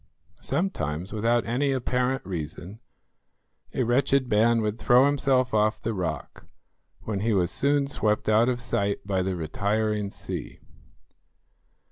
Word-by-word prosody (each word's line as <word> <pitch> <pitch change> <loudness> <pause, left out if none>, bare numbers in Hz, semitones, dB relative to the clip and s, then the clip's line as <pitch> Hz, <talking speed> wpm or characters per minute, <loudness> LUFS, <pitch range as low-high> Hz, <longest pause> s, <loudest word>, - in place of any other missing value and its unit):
Sometimes, 95 - -2
without 115 +2 +1
any 135 +4 0
apparent 130 0 -1
reason, 90 +3 -6 0.9
a 130 - 0
wretched 130 +2 +2
man 115 +2 +4
would 105 +1 -2
throw 125 +2 +5
himself 135 -3 +2
off 110 +1 +2
the 115 - -3
rock, 90 -4 -5 0.5
when 105 -3 -3
he 110 +2 +1
was 90 -3 +1
soon 140 0 +1
swept 105 -6 -1
out 110 +3 +4
of 125 -1 -1
sight 100 -5 -1
by 95 -2 0
the 95 0 -1
retiring 100 +5 -1
sea. - - -7
110 Hz, 130 wpm, -26 LUFS, 100-125 Hz, 0.9 s, throw